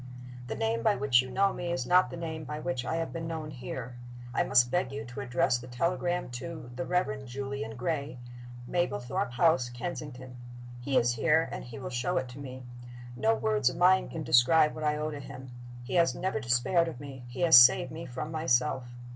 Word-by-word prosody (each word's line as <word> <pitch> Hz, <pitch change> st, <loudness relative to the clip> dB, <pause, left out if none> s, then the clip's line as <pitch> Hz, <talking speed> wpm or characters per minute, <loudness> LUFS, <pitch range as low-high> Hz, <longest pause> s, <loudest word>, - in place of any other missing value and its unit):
"The 110 Hz, -, -4 dB
name 115 Hz, +1 st, -1 dB
by -, -, +3 dB
which 130 Hz, -1 st, +3 dB
you 130 Hz, -, -8 dB
know 195 Hz, +8 st, +2 dB
me 175 Hz, -1 st, -4 dB
is 150 Hz, -8 st, -2 dB
not 180 Hz, +4 st, +4 dB
the -, -, -7 dB
name 160 Hz, -2 st, -5 dB
by 150 Hz, +2 st, -5 dB
which 130 Hz, -4 st, -3 dB
I 145 Hz, -, -1 dB
have 165 Hz, 0 st, -3 dB
been 165 Hz, -1 st, -4 dB
known 160 Hz, -2 st, -5 dB
here. 125 Hz, -2 st, -7 dB, 0.4 s
I -, -, +2 dB
must 120 Hz, 0 st, +4 dB
beg 135 Hz, -6 st, 0 dB
you 140 Hz, +1 st, -5 dB
to 125 Hz, +3 st, -8 dB
address 125 Hz, -1 st, +1 dB
the 125 Hz, -, -11 dB
telegram 175 Hz, +6 st, -1 dB
to 155 Hz, -3 st, -8 dB
'The 130 Hz, +1 st, -3 dB
Reverend 140 Hz, -7 st, -1 dB
Julian 135 Hz, -2 st, -5 dB
Gray, 140 Hz, -1 st, -3 dB, 0.5 s
Mablethorpe 125 Hz, -7 st, -1 dB
House, 130 Hz, -2 st, +3 dB
Kensington.' 130 Hz, -1 st, -7 dB, 0.4 s
He 130 Hz, +2 st, 0 dB
is 120 Hz, +1 st, +3 dB
here, 160 Hz, +6 st, +2 dB
and -, -, -5 dB
he 120 Hz, +3 st, -9 dB
will 135 Hz, -, -6 dB
show 150 Hz, +9 st, -1 dB
it 130 Hz, -1 st, -2 dB
to 125 Hz, +3 st, -10 dB
me. 130 Hz, -2 st, -8 dB, 0.5 s
No 220 Hz, -, +2 dB
words 110 Hz, -, +1 dB
of -, -, -7 dB
mine 185 Hz, +1 st, +4 dB
can 160 Hz, -, -5 dB
describe 150 Hz, +5 st, +5 dB
what 155 Hz, -, -7 dB
I 150 Hz, 0 st, +1 dB
owe 155 Hz, +1 st, -2 dB
to 145 Hz, -, -6 dB
him. 130 Hz, -2 st, -10 dB, 0.3 s
He 120 Hz, -, -7 dB
has 170 Hz, -2 st, +3 dB
never 185 Hz, -4 st, -2 dB
despaired 130 Hz, +7 st, +2 dB
of 160 Hz, -7 st, -6 dB
me 135 Hz, -3 st, -9 dB
he 120 Hz, +7 st, -7 dB
has 170 Hz, -2 st, +7 dB
saved 125 Hz, +1 st, +7 dB
me 165 Hz, +2 st, -7 dB
from 130 Hz, +5 st, -5 dB
myself. 130 Hz, -5 st, +1 dB
135 Hz, 210 wpm, -29 LUFS, 125-165 Hz, 0.5 s, has